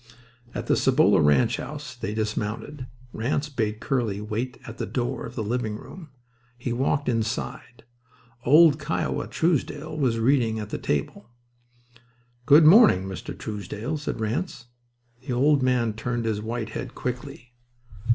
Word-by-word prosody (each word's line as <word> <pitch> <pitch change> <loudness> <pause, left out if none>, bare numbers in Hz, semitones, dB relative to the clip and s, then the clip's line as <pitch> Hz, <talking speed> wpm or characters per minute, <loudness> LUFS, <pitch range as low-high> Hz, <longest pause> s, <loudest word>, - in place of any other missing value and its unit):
At - - -3
the - - +3
Cibolo 130 -7 +4
ranch 80 - +3
house 145 0 -7
they 105 -3 -4
dismounted. 110 +5 -3 0.3
Ranse 140 +6 -1
bade 110 -6 -2
Curly 115 -7 -1
wait 115 +5 -4
at 115 +1 -9
the - - -2
door 120 -2 -2
of - - -11
the 110 - -2
living 110 -1 -2
room. 165 - -11 0.5
He 120 0 -3
walked 140 +3 0
inside. 115 0 -3 0.6
Old 150 +3 +6
"Kiowa" 155 +2 -2
Truesdell 155 -1 -1
was 125 -5 +1
reading 115 -2 +2
at 105 -1 -6
a - - -2
table. 75 +9 -3 1.2
"Good 150 +2 +8
morning, 185 - +7
Mr. 95 -2 -7
Truesdell," 110 +7 -5
said 145 - -4
Ranse. 120 - -3 0.6
The 130 - -1
old 140 +3 +3
man 125 -3 +1
turned 120 +1 -3
his 110 -2 -1
white 115 0 -4
head - - -6
quickly. 125 0 -6
120 Hz, 140 wpm, -25 LUFS, 110-140 Hz, 1.2 s, Good